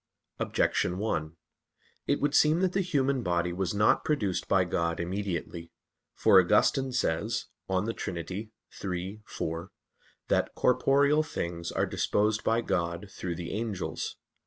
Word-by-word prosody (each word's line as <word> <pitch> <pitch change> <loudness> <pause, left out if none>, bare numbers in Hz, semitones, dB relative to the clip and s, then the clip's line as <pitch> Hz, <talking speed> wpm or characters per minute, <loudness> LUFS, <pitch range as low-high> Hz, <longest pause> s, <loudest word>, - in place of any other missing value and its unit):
Objection 90 - +1
1: 85 -6 -2 0.7
It - - +2
would 145 0 +1
seem 155 +3 +4
that 185 -1 +1
the 195 - +2
human 140 -7 +1
body 85 -3 0
was 95 +2 -2
not 105 +1 +3
produced 105 - 0
by 95 -1 +4
God 85 -1 -1
immediately. 85 -2 -4 0.4
For - - +6
Augustine 135 -1 +3
says 115 -1 0 0.2
(De 95 +4 0
Trin. 90 - -4 0.5
iii, 95 +2 -5
4), 85 +4 -4 0.6
that - - +1
"corporeal 140 +4 +3
things 85 - -4
are - - +1
disposed 105 +1 0
by 115 +1 +2
God 85 -1 -2
through 90 -3 -4
the 85 0 -5
angels." 105 -3 -3
100 Hz, 135 wpm, -29 LUFS, 85-125 Hz, 0.7 s, For